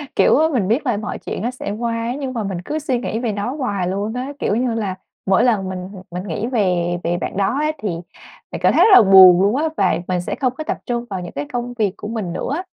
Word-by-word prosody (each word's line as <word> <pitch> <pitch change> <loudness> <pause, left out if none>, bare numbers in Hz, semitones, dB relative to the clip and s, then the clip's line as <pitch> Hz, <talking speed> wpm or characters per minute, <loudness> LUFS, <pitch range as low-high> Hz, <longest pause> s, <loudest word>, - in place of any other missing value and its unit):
kiểu, - - +4
mình 205 -7 +1
biết 240 +8 +1
là 240 -5 +1
mọi 210 - -4
chuyện - - -5
nó 240 +4 -1
sẽ 250 -5 -6
qua 230 +1 -2
ấy 245 +3 -3
nhưng 265 -2 -4
mà 225 -3 -2
mình 190 -3 -4
cứ 305 - -2
suy 265 -5 -1
nghĩ 225 -2 -3
về 235 -3 -1
nó 205 +7 -3
hoài 205 -10 -2
luôn 200 +4 -2
á, 255 +3 -4
kiểu 205 - 0
như 245 0 0
là, 205 -5 -2 0.3
mỗi 190 -1 +3
lần 210 -6 +1
mình 185 0 -5 0.2
mình 180 +1 -4
nghĩ 200 +7 -3
về 180 -7 0
về 175 +1 0
bạn 185 - -4
đó 200 +6 +1
á 305 0 +1
thì 215 -7 -3 0.6
mình - - -6
cảm - - +4
thấy - - +5
rất 440 - +5
là - - +10
buồn 185 -2 +9
luôn 205 +5 +3
á, 315 +3 +1
và 185 -5 +2
mình 180 -1 0
sẽ - - -4
không 255 -2 0
có 310 - -4
tập - - -3
trung 240 0 -2
vào 190 -2 -4
những 175 - -7
cái 145 +1 -4
công 245 0 -3
việc 210 -5 0
của - - -7
mình 210 -6 -4
nữa 180 - -3
á. 365 +3 -4
215 Hz, 275 wpm, -20 LUFS, 185-245 Hz, 0.6 s, là